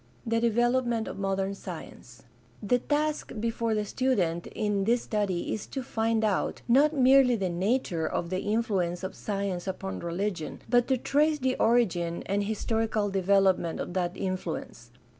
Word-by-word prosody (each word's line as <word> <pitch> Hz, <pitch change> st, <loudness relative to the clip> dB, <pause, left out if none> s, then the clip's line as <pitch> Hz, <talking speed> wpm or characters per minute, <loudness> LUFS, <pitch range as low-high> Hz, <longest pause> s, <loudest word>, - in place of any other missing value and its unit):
The 230 Hz, 0 st, +1 dB
development 240 Hz, 0 st, +1 dB
of -, -, -6 dB
modem 195 Hz, 0 st, -1 dB
science. 195 Hz, -, -10 dB, 0.2 s
— -, -, -14 dB
^The 245 Hz, +4 st, +2 dB
task 300 Hz, +1 st, 0 dB
before 230 Hz, 0 st, -1 dB
the 210 Hz, -1 st, -1 dB
student 190 Hz, -10 st, 0 dB
in 205 Hz, -3 st, -1 dB
this 235 Hz, +2 st, +2 dB
study 200 Hz, -5 st, -1 dB
is 215 Hz, -, -5 dB
to 270 Hz, -, -5 dB
find 225 Hz, -1 st, 0 dB
out, 210 Hz, -3 st, 0 dB
not 275 Hz, +5 st, +5 dB
merely 260 Hz, -1 st, +6 dB
the 190 Hz, -5 st, -1 dB
nature 180 Hz, -3 st, 0 dB
of 170 Hz, +2 st, -3 dB
the 185 Hz, -, 0 dB
influence 195 Hz, -5 st, -1 dB
of 190 Hz, -, -4 dB
science 195 Hz, -3 st, -3 dB
upon 190 Hz, 0 st, -4 dB
religion, 170 Hz, 0 st, -3 dB
but 245 Hz, -1 st, +3 dB
to 265 Hz, -, +2 dB
trace 300 Hz, +5 st, +2 dB
the 260 Hz, -2 st, 0 dB
origin 175 Hz, -8 st, +1 dB
and 200 Hz, +1 st, 0 dB
historical 220 Hz, -1 st, -1 dB
development 190 Hz, -3 st, +2 dB
of -, -, -4 dB
that 180 Hz, -1 st, -1 dB
influence. 180 Hz, -10 st, -4 dB
210 Hz, 160 wpm, -28 LUFS, 185-240 Hz, 0.2 s, merely